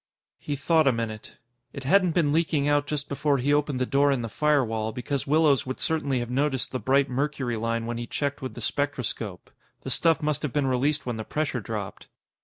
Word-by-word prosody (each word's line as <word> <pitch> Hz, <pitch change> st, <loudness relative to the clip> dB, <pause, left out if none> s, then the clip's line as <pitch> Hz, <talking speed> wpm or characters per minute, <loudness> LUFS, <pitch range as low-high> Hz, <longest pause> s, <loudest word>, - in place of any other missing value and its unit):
He 145 Hz, -, -3 dB
thought 155 Hz, +2 st, +3 dB
a -, -, +6 dB
minute. 115 Hz, -2 st, -5 dB, 0.4 s
It 140 Hz, -, -7 dB
hadn't 180 Hz, +3 st, +3 dB
been 160 Hz, -5 st, +3 dB
leaking 155 Hz, -3 st, +1 dB
out 145 Hz, 0 st, +2 dB
just 145 Hz, -1 st, -2 dB
before 140 Hz, 0 st, +1 dB
he 140 Hz, +3 st, +1 dB
opened 145 Hz, -3 st, +1 dB
the 130 Hz, -, +1 dB
door 140 Hz, +2 st, +3 dB
in 130 Hz, -3 st, 0 dB
the 115 Hz, -, -4 dB
firewall, 115 Hz, -6 st, +1 dB
because 125 Hz, +4 st, -3 dB
Willows 150 Hz, -3 st, +3 dB
would 130 Hz, -, -4 dB
certainly 145 Hz, -5 st, 0 dB
have 120 Hz, 0 st, -3 dB
noticed 135 Hz, 0 st, 0 dB
the 130 Hz, -, -2 dB
bright 135 Hz, +2 st, +3 dB
mercury 135 Hz, -2 st, -1 dB
line 115 Hz, +1 st, -1 dB
when 120 Hz, 0 st, -3 dB
he 120 Hz, -, -5 dB
checked 140 Hz, +2 st, -2 dB
with 130 Hz, -, -5 dB
the 120 Hz, -, -7 dB
spectroscope. 120 Hz, -8 st, -3 dB, 0.3 s
The -, -, -4 dB
stuff 165 Hz, -2 st, +3 dB
must 150 Hz, -2 st, 0 dB
have 150 Hz, -, -2 dB
been 145 Hz, +2 st, 0 dB
released 135 Hz, +4 st, +1 dB
when 120 Hz, -2 st, -3 dB
the 110 Hz, -, -4 dB
pressure 145 Hz, -2 st, -2 dB
dropped. 105 Hz, -2 st, -6 dB
140 Hz, 210 wpm, -26 LUFS, 120-150 Hz, 0.4 s, a